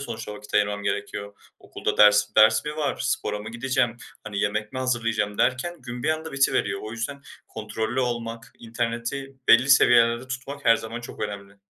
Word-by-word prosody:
sonuçta 115 -5 -6
vakit 105 0 -12
ayırmam 105 0 +1
gerekiyor. 100 0 -4 0.2
"Okulda - - -4
ders 105 0 +6
ders 110 0 +6
mi 150 +1 -5
var, 145 -3 -1
spora 105 - -1
mı 105 +1 -8
gideceğim, 120 -1 0 0.3
hani, 100 -2 -5
yemek 105 +1 -1
mi 130 - -4
hazırlayacağım?" 115 -5 -1
derken 130 +6 0
gün 120 0 -7
bir - - 0
anda 160 +1 -2
bitiveriyor. 105 -7 +1
O 110 - -6
yüzden 120 +5 -5 0.3
kontrollü 110 +3 -3
olmak, 115 -2 -4
interneti 120 +4 -4
belli 125 +4 +6
seviyelerde 120 -1 +5
tutmak 140 +2 -6
her 115 - +6
zaman 115 +2 -6
çok 120 - -10
önemli. 100 -1 -6
115 Hz, 170 wpm, -25 LUFS, 105-130 Hz, 0.3 s, ders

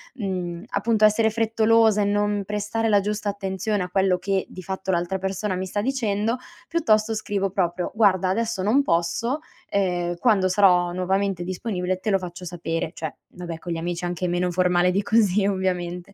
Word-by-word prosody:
mhmm, 180 -6 -4
appunto 215 +1 +2
essere 220 +1 +4
frettolosa 225 -1 +3
e - - +2
non 205 0 +1
prestare 210 +2 -1
la 205 - +5
giusta 210 0 -2
attenzione 200 0 -2
a 180 - -6
quello 190 -1 +2
che 195 +1 -1
di 185 - -9
fatto 190 +1 -5
l'altra 175 +2 -1
persona 195 +1 -2
mi 185 +1 -3
sta 205 +2 -2
dicendo, 230 -2 0 0.3
piuttosto 225 -10 +2
scrivo 205 -2 -1
proprio: 175 -2 -1
"Guarda 190 -4 +3
adesso 225 -1 -1
non 235 +8 +4
posso, 175 - 0 0.3
ehm, 175 -3 0
quando 200 -3 +3
sarò 180 -2 +4
nuovamente 190 0 0
disponibile 185 0 -3
te 215 - -3
lo 195 - +4
faccio 180 -1 -8
sapere." 165 -1 -3
Cioè 160 -2 -5 0.2
vabbè, 170 -2 -6
con 175 - -6
gli - - -3
amici 175 +1 -3
anche 175 +1 -2
meno 175 +1 0
formale 180 0 +3
di 200 +3 0
così 205 -2 +3
ovviamente; 180 -1 -2
195 Hz, 175 wpm, -24 LUFS, 180-210 Hz, 0.3 s, la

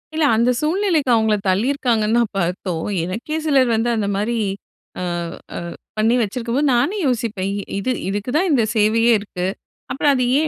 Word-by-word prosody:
இல்ல. 315 -1 +2
அந்த 235 +2 +3
சூழ்நிலைக்கு 325 -3 +1
அவங்கள 220 -1 +2
தள்ளியிருக்காங்கன்னு 225 +1 +1
தான் 235 -3 0
பாத்தோம். 175 -2 -2 0.2
எனக்கே 225 - -4
சிலர் 270 -5 +3
வந்து 225 +2 0
அந்த 215 -2 -1
மாரி 215 +4 -1 0.6
அ - - -4 0.5
அ - - -3 0.4
பண்ணி 225 +3 +3
வச்சிருக்கும்போது 240 +6 0
நானே 345 - +1
யோசிப்பேன், 225 -6 -1
இ 200 - -4 0.2
இது 230 +6 -1 0.2
இதுக்கு 205 +4 -3
தான் 370 +4 +2
இந்த 255 -6 +3
சேவையே 225 +2 +3
இருக்கு. 180 -3 -5 0.5
அப்பறம் 285 +1 +2
அதை 255 -2 +1
ஏன் 310 +1 +2
230 Hz, 160 wpm, -20 LUFS, 210-275 Hz, 0.6 s, அந்த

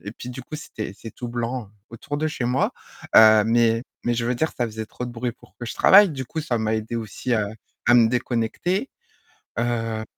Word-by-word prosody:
et 105 - -6
puis 125 +1 -8
du 125 0 -7
coup, 155 +4 -7
c'était 110 -9 -6
c'est 115 - -10
tout 120 - -6
blanc 120 -2 -3 0.2
autour 130 +5 -5
de 155 +1 0
chez 145 -5 -3
moi, 125 +2 +1 0.4
heu, 110 -1 +8
mais 115 0 +3 0.2
mais 120 - 0
je 115 0 -1
veux 125 +1 0
dire, 160 +6 0
ça 120 - +1
faisait 110 0 -6
trop 125 - -6
de 120 - -5
bruit 120 0 -3
pour 105 -5 -21
que 120 - -6
je - - -5
travaille, 200 +1 +7
du 135 -3 -5
coup, 160 +6 -4
ça 130 -6 -1
m'a 110 0 0
aidée 110 +2 -3
aussi 115 +2 -2
à 105 -2 +1 0.4
à 120 - +6
me 115 -2 +6
déconnecter, 125 - -1 0.7
heu 115 -2 -1
120 Hz, 225 wpm, -23 LUFS, 110-125 Hz, 0.7 s, heu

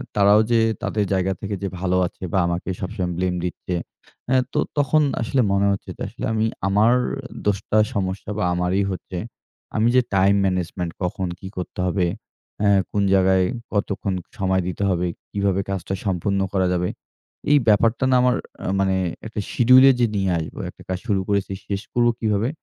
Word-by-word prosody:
তারাও 105 +1 +6
যে, 115 - +5 0.2
তাদের 105 -2 0
জায়গা 95 0 +1
থেকে 100 0 -3
যে 100 - 0
ভালো 90 0 +1
আছে 90 - -13
বা 95 - +3
আমাকে 85 +2 -3
সবসময় 90 -1 -3
ব্লেম 90 0 0
দিচ্ছে। 90 0 -3 0.6
আ - - +4 0.2
তো 150 - +1 0.2
তখন 145 +2 +3 0.2
আসলে 130 +3 +1
মনে 100 0 +2
হচ্ছে 100 - -4
যে, - - -14
আসলে - - -6
আমি 110 0 +1 0.2
আমার 105 +4 +4 0.6
দোষটা, 105 +1 0 0.2
সমস্যা 95 0 -3
বা 105 - 0
আমারি 90 +3 +1
হচ্ছে। 90 0 -6 0.6
আমি 110 +2 +3
যে 130 - +7
টাইম 95 +1 +4
ম্যানেজমেন্ট 90 -2 -2
কখন 90 +1 -2
কী 95 - -8
করতে 90 0 -6
হবে? 90 0 +1 0.6
আ 105 - +4 0.2
কোন 100 -1 +1
জায়গায় 95 -1 +4 0.3
কতক্ষণ 100 -1 -1 0.3
সময় 95 -1 +2
দিতে 90 +2 -3
হবে? 90 -1 0 0.2
কিভাবে 100 -1 +1
কাজটা 95 0 -3
সম্পন্ন 100 +1 0
করা 95 -1 +2
যাবে? 90 0 0 0.6
এই 145 - +7
ব্যাপারটা 115 +4 +3
না? - - +5
আমার 125 0 +3 0.3
আ - - -2
মানে 95 -1 +2 0.3
একটা 110 - -5
শিডিউলে 130 +2 +7
যে 120 - +5
নিয়ে 95 -2 +1
আসব, 80 - -6
একটা - - -15
কাজ 95 0 -2
শুরু 100 -4 +1
করেছি, 100 -1 0 0.2
শেষ 100 0 -2
করব 120 -1 +3
কিভাবে? 110 +2 +1
100 Hz, 175 wpm, -22 LUFS, 95-105 Hz, 0.6 s, যে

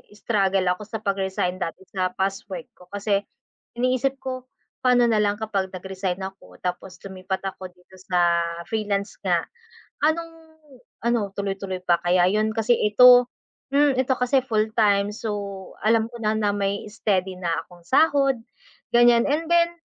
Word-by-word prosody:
struggle 195 -3 +1
ako 180 +4 -4
sa 220 0 -5
pag-resign 190 -3 -1
dati 180 +1 -5
sa 185 -2 -2
past 195 +1 -2
work 175 -4 -6
ko 180 - -16
kasi 200 0 0 0.6
iniisip 255 +2 +1
ko, 255 -1 -5 0.4
"Paano 250 -1 +5
nalang 210 -1 +1
kapag 200 -3 -1
nag-resign 190 0 -4
ako 190 0 -9
tapos 180 +1 -4
lumipat 190 0 -4
ako 190 -1 -5
dito 180 +1 -21
sa 175 -2 +2 0.3
freelance 205 -2 -2
nga, - - +1 0.6
anong 330 +2 0 0.7
ano, 235 -4 0
tuloy-tuloy 195 -2 -4
pa 175 -1 +3
kaya 180 0 +4
'yon 215 +2 +1
kasi 225 +2 +2
ito 245 +4 +7 0.5
hmm, 285 -2 +4
ito 260 0 +1
kasi 250 +1 +2
full 220 -2 +1
time 205 -2 +3
so, 200 -3 -5
alam 225 0 +3
ko 240 - -10
na 215 0 +1
na 210 -1 +1
may 200 0 -1
steady 190 -4 0
na 175 - -1 0.2
akong 175 -1 -17
sahod." 275 - +3 0.6
ganiyan 240 0 +6
and 310 +3 0
then 340 0 +4
205 Hz, 150 wpm, -24 LUFS, 190-240 Hz, 0.7 s, ito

